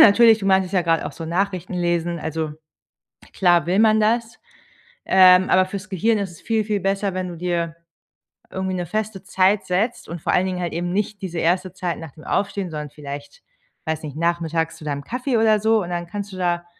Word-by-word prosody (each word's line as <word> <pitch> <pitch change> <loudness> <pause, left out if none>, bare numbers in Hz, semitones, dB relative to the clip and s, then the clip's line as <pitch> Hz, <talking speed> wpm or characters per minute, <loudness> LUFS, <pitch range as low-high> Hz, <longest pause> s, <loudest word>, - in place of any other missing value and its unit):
natürlich, 225 +1 +7
du 195 - -4
meintest 190 -1 +2
ja 180 - +3
gerade 165 -1 +1
auch - - -6
so 165 - -8
Nachrichtenlesen 175 -1 -1
also 160 0 -3 0.8
klar 175 -4 +3
will 180 +3 +1
man 220 0 +5
das, 230 +2 0 0.6
ähm, 185 0 +6
aber 185 0 +4
fürs 200 +2 -7
Gehirn 215 +4 +1
ist 195 -3 -3
es 165 - -15
viel 220 -1 0
viel 205 -1 -1
besser, 195 0 -1
wenn 185 0 -3
du 175 - -7
dir 170 -1 -2 0.7
irgendwie 190 0 -3
'ne 180 -1 -2
feste 215 -1 -3
Zeit 190 +2 +2
setzt 200 +5 -1
und 170 +1 -5
vor - - 0
allen 180 - +3
Dingen 185 -1 -3
halt 175 -2 -3
eben 175 +1 -2
nicht 205 +1 -2
diese 175 -3 -5
erste 180 +3 +1
Zeit 180 -2 -3
nach 160 -4 -9
dem 155 - -16
Aufstehen, 195 -2 -1
sondern 150 -1 -5
vielleicht 145 0 -9 0.4
weiß 160 0 -2
nicht, 150 -1 -7
nachmittags 165 -1 -1
zu 160 - -13
deinem 140 -2 -3
Kaffee 250 0 -1
oder 220 -1 +4
so. 220 0 +3
Und 175 - -5
dann 175 0 -3
kannst 200 +1 -6
du 185 - -7
da 175 -1 -1
185 Hz, 205 wpm, -22 LUFS, 170-200 Hz, 0.8 s, natürlich